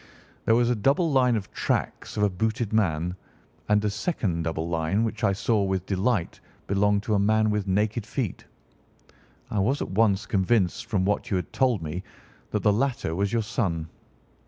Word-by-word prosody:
"There 115 - +4
was 120 +1 +3
a - - +2
double 140 - +2
line 125 -3 +4
of 100 -3 -4
tracks - - -2
of 105 - +2
a 105 - +4
booted 110 +3 -1
man, 90 -5 +1 0.5
and 105 0 +3
a - - +2
second 100 - -1
double 80 0 -2
line 85 +5 0
which 110 -1 -3
I 100 - +4
saw 105 +2 +1
with 95 -2 -1
delight 95 -1 0 0.3
belonged 100 +1 +2
to 110 - -1
a 100 - +3
man 110 +1 +3
with 105 -2 -1
naked 105 +3 0
feet. 120 -8 -3 1.1
I 105 - 0
was 130 +9 +1
at - - -4
once 105 0 +2
convinced 100 +3 +1
from 100 -4 0
what 105 +1 0
you - - 0
had 90 -3 -3
told 125 -9 +2
me 80 +4 -4 0.5
that - - -2
the 105 - +4
latter 120 -7 0
was 100 +3 0
your 115 -1 +1
son. 85 -7 -2
105 Hz, 185 wpm, -26 LUFS, 95-115 Hz, 1.1 s, There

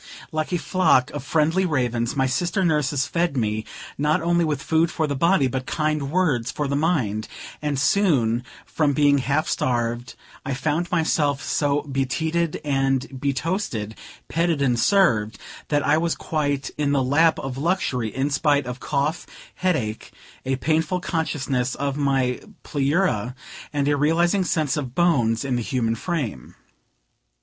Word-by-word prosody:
Like 155 +1 -2
a 175 - +1
flock 165 -8 +2
of 145 -3 -5
friendly 160 +5 +2
ravens, 120 -8 0
my 135 -1 +2
sister 175 +9 0
nurses 145 -4 +1
fed 170 -4 -1
me, 110 -2 -1 0.3
not 150 +2 +2
only 170 +1 +2
with 150 -3 -1
food 160 +1 +2
for 160 -2 -1
the 145 -1 -2
body, 170 +1 +3
but 130 0 -3
kind 155 -3 -1
words 145 -9 +1
for 150 - -2
the 140 - -1
mind; 130 - 0 0.3
and 150 -2 -1
soon, 135 - +2 0.2
from 150 -3 0
being 145 -1 +4
half 140 +5 0
starved, 120 0 -1 0.3
I 135 -1 -2
found 155 +5 -1
myself 150 -4 +1
so 145 -1 0
beteaed 155 +4 -1
and 135 -2 +1 0.2
betoasted, 140 - -2 0.3
petted 165 -2 0
and 125 -4 +1
served, 115 - +3 0.3
that 145 -1 +1
I 155 +1 +3
was 170 0 0
quite 145 -3 -2
"in 145 -1 +1
the 135 -2 +2
lap 160 +5 +3
of 135 -1 -5
luxury," 145 -8 0
in 135 +6 -2
spite 145 -1 +2
of 125 +1 -6
cough, 145 +5 -1 0.3
headache, 140 -13 -2 0.4
a 135 - +1
painful 160 +5 0
consciousness 135 -7 -1
of 140 -1 -2
my 135 -3 +1 0.2
pleura, 140 - 0 0.4
and 145 -1 0
a 145 - +3
realizing 170 +6 +2
sense 155 -4 0
of 130 -4 -4
bones 140 -9 +2
in 130 -3 0
the - - -1
human 115 -1 0
frame. 115 - -4
145 Hz, 155 wpm, -23 LUFS, 130-160 Hz, 0.4 s, being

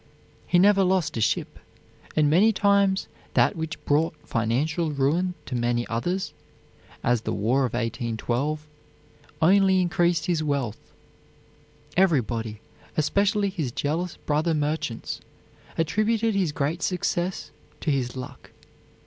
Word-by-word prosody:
He 180 - +3
never 200 +2 +5
lost 180 -5 +1
a 115 - -1
ship, - - 0 0.6
and 155 -1 +4
many 185 +9 +5
times 200 -2 +2 0.3
that - - +4
which 160 -2 -5
brought 155 +3 +2
financial 145 +9 0
ruin 155 +6 +1
to - - -7
many 120 0 0
others, 175 +12 -2 0.7
as 120 -2 +2
the - - -3
War 125 +7 +1
of 125 - -4
1812, 120 +5 -2 0.8
only 190 +2 +5
increased 175 -2 +2
his 170 -3 0
wealth. 140 -7 -1 1.2
Everybody, 120 - +1 0.4
especially 200 +6 +2
his 155 -10 -3
jealous 160 +7 -2
brother 155 +2 0
merchants, 150 -5 -2 0.6
attributed 215 +7 +1
his 190 -6 +1
great 145 +4 -2
success 180 0 -1 0.3
to 155 - 0
his 130 -3 -1
luck. 130 - -8
155 Hz, 120 wpm, -25 LUFS, 125-185 Hz, 1.2 s, never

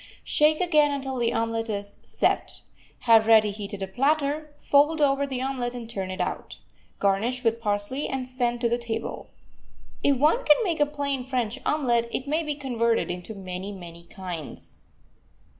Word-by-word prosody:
Shake 305 +1 +4
again, 305 -5 +4
until 270 -2 -3
the 235 -1 +1
omelet 225 0 -1
is 200 -1 -5
"set." - - -1 0.4
Have 225 -2 +5
ready 215 -2 +6
heated 200 -1 -6
a - - -3
platter, 290 +6 0
fold 295 +3 +3
over 280 -1 +2
the 260 -2 -3
omelet 250 -2 -2
and 235 -2 -6
turn 195 -5 -4
it 185 - -6
out. - - -3 0.4
Garnish 220 +6 0
with 230 0 +1
parsley, 205 +6 -1
and 265 -1 -3
send 240 -2 -1
to 240 - +3
the 240 +1 0
table. 230 -1 -5 0.7
If 280 -2 +3
one 310 - +3
can 300 - +6
make 340 -6 -1
a 295 - +4
plain 285 -3 -2
French 250 -2 -2
omelet, 240 -6 +1
it 265 - -3
may 305 +3 0
be 300 -2 -3
converted 235 -7 0
into 180 +5 -6
many, 190 0 -6
many 170 -3 -10
kinds. 175 -4 -8
240 Hz, 170 wpm, -26 LUFS, 215-280 Hz, 0.7 s, ready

